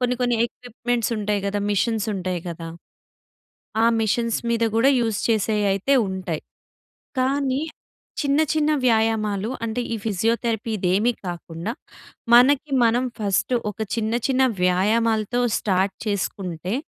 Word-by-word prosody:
కొన్ని, 250 0 +1
కొన్ని 245 -1 +2
ఎ‌క్విప్‌మెంట్స్‌ 240 -1 -3
ఉంటాయి 205 -1 -1
గదా! 205 +1 -1
మెషిన్స్ 220 +1 0
ఉంటాయి 185 -2 -3
గదా! 165 0 -6 1.2
ఆ - - +6
మెషిన్స్ 230 +1 0
మీద 230 0 +1
గూడా 250 +5 +5
యూస్ 225 -3 -1
చేసేయి 215 -1 +1
అయితే 195 +8 +1
ఉంటాయి. 185 -4 -4 0.8
కానీ 270 +1 +1 0.6
చిన్న, 285 +1 +2
చిన్న 310 0 +2
వ్యాయామాలు 220 -2 +1
అంటే 230 +2 -2
ఈ - - 0
ఫిజియోథెరపీ 225 +2 -1
ఇదేమీ 195 +5 +2 0.2
కాకుండా, 175 +2 -5 0.6
మనకి 275 +4 +5
మనం 235 +2 +2
ఫస్ట్ 200 +2 0 0.2
ఒక 210 - -14 0.2
చిన్న 220 -1 -1
చిన్న 265 -1 +2 0.2
వ్యాయామాలతో 215 +5 +2 0.2
స్టార్ట్ 190 -1 0
చేసుకుంటే, 185 -2 -3
220 Hz, 120 wpm, -23 LUFS, 195-240 Hz, 1.2 s, ఆ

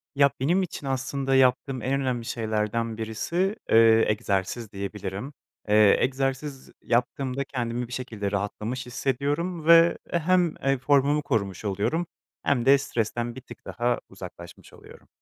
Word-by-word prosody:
Ya, 140 0 +5
benim 175 +8 +2
için 155 -5 -6
aslında 135 +1 -1
yaptığım 130 0 +2
en 135 +4 0
önemli 125 -3 -2
şeylerden 110 0 -2
birisi, 170 - -1
eee, 115 0 +6
egzersiz 105 +1 -1
diyebilirim. 100 +5 -5 0.4
Eee, 105 -1 +6
egzersiz 135 +1 -2
yaptığımda 125 +3 -1
kendimi 120 -2 -3
bir 125 - -9
şekilde 110 -6 -4
rahatlamış 105 +5 -3
hissediyorum 145 +7 -2
ve, 170 +1 +6
e 170 - +1
hem, 175 0 +2
eee, 135 0 +2
formumu 140 +2 +2
korumuş 110 -9 -2
oluyorum 105 - -1 0.4
hem 125 -4 +1
de 140 +1 +7
stresten 120 -2 -2
bir 130 - -8
tık 120 -3 -14
daha 120 +2 -1
uzaklaşmış - - -11
oluyorum. - - -16
125 Hz, 140 wpm, -26 LUFS, 110-140 Hz, 0.4 s, de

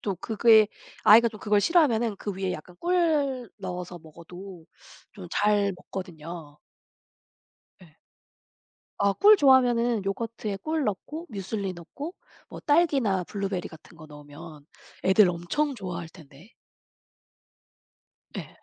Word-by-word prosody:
또 200 -3 -3
그게 220 +2 +4 0.4
아이가 230 +2 +7
좀 215 - -12
그걸 210 0 +2
싫어하면은 240 - +2
그 205 - -5
위에 190 -1 -3
약간 180 +1 -9
꿀 305 -8 0
넣어서 180 -2 -6
먹어도 170 +2 -12 0.5
좀 185 -4 -10
잘 205 0 +2
먹거든요. 165 -5 -9 1.2
예. 165 -5 -18 1.1
아 200 0 +3
꿀 420 - +6
좋아하면은 245 - +3
요거트에 210 0 -4
꿀 315 -2 -1
넣고 300 - -4
뮤즐리 200 -1 -4
넣고 275 - -8 0.3
뭐 - - -10
딸기나 275 - +2
블루베리 195 -1 -4
같은 160 +1 -16
거 155 -1 -13
넣으면 150 +1 -12 0.4
애들 190 +1 +5
엄청 180 - -2
좋아할 180 -6 -6
텐데. 160 - -17 1.8
예. - - -6
200 Hz, 245 characters per minute, -26 LUFS, 175-235 Hz, 1.8 s, 아이가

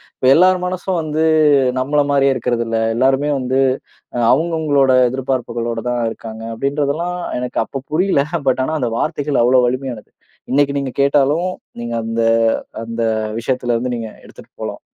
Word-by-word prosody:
இப்ப - - -4
எல்லார் 185 +2 +5
மனசும் 180 0 -2
வந்து 155 0 -1 0.6
நம்மள 145 +3 +1
மாரியே 140 -1 +3
இருக்குறது 120 -2 -1
இல்ல. 115 0 0 0.2
எல்லாருமே 135 +4 +2
வந்து 130 +1 0 0.6
அ - - -2 0.2
அவங்க 165 +5 0
அவங்களோட 140 -4 +3 0.2
எதிர்பார்ப்புகளோட 120 -3 -2
தான் 120 0 -1
இருக்காங்க, 110 0 -9
அப்படின்றதெல்லாம் 145 +7 -1 0.2
எனக்கு 125 0 -3
அப்ப 135 +2 -7
புரியல. 170 -2 +2 0.3
பட் 130 0 +1
ஆனா 160 - -2
அந்த 120 -2 -1
வார்த்தைகள் 145 +1 0
அவ்வளோ 125 +1 +4
வலிமையானது. 125 -3 -4 0.4
இன்னைக்கு 140 +1 +2
நீங்க 135 -2 -4
கேட்டாலும் 145 +5 +2 0.3
நீங்க 120 0 -4
அந்த 115 0 -1 0.6
அந்த 115 0 -4 0.4
விஷயத்துல 120 0 -1
இருந்து 125 +1 -2
நீங்க 115 -1 -5 0.2
எடுத்துட்டு - - -16
போலாம். - - -5
135 Hz, 150 wpm, -18 LUFS, 120-145 Hz, 0.6 s, எல்லார்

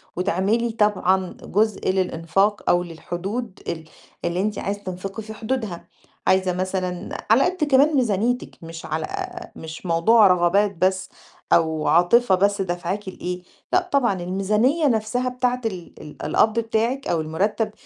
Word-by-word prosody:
وتعملي 200 +6 +1
طبعًا 190 -4 +1
جزء 215 0 0
للإنفاق 190 +2 0
أو 175 0 +3
للحدود 185 +6 -5
ال 160 -1 -3 0.4
اللي 175 +1 0
أنتِ 210 +1 -1
عايزة 205 +1 -3
تنفقي 195 +3 -6
في 220 +1 -8
حدودها، 220 -5 -4 0.4
عايزة 185 -1 +3
مثلًا 185 -1 -3
على 230 +5 +6
قد 360 -2 0
كمان 290 +2 +4
ميزانيتِك 240 0 0
مش 165 0 -8
على 155 0 -3 0.5
مش 160 +3 -9
موضوع 190 +6 +5
رغبات 190 +3 +3
بس 190 +2 0 0.4
أو 160 -2 +2
عاطفة 185 +7 +4
بس 200 +2 +2
دَافْعاكِ 180 +2 -3
لإيه، 180 -1 -5 0.3
لأ 365 0 +2
طبعًا، 240 -10 +2
الميزانية 210 - +1
نَفْسها 235 +2 0
بتاعة 250 0 -1
ال 185 -6 -4
ال 150 - -9
القَبْض 220 +1 +3
بتاعِك 230 +4 -1
أو 165 -2 +1
المُرتَّب 200 +8 -1
195 Hz, 140 wpm, -23 LUFS, 180-225 Hz, 0.5 s, على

